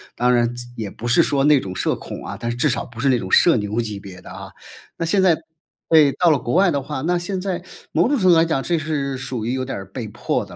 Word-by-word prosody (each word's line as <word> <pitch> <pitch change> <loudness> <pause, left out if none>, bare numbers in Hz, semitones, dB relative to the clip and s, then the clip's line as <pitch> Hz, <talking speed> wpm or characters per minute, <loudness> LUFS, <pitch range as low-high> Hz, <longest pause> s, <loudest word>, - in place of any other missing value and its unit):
当 125 +1 +2
然 120 -1 +2 0.2
也 110 -4 -5
不 120 - -7
是 160 +8 +5
说 140 -1 +1
那 150 -2 +5
种 95 -4 -6
社 - - 0
恐 - - -8
啊， - - -6
但 120 0 -2
是 120 - -5
至 150 - +2
少 120 - -2
不 120 -1 -13
是 140 - +1
那 125 - +3
种 95 -4 -6
社 170 - +6
牛 105 +2 -2
级 105 -3 -5
别 95 -2 -11
的 - - -12
啊。 - - -9 0.5
那 165 - -2
现 190 +3 +2
在 170 -4 +4 0.5
对， 155 -3 +6
到 175 -2 +3
了 150 - +4
国 120 - -4
外 195 0 +5
的 140 -4 0
话， 140 -1 -5
那 175 +3 +1
现 185 +2 -3
在 185 -2 -3 0.3
某 - - +2
种 290 - +2
程 185 -4 +2
度 - - +8
上 165 - +5
来 - - +1
讲， 160 -5 0
这 170 +4 0
是 140 -3 -2
属 130 -4 -5
于 120 - -1
有 130 - -2
点 130 -5 -5
儿 95 - -7
被 115 +1 -5
迫 - - -2
的 - - -13
135 Hz, 315 characters per minute, -21 LUFS, 120-165 Hz, 0.5 s, 度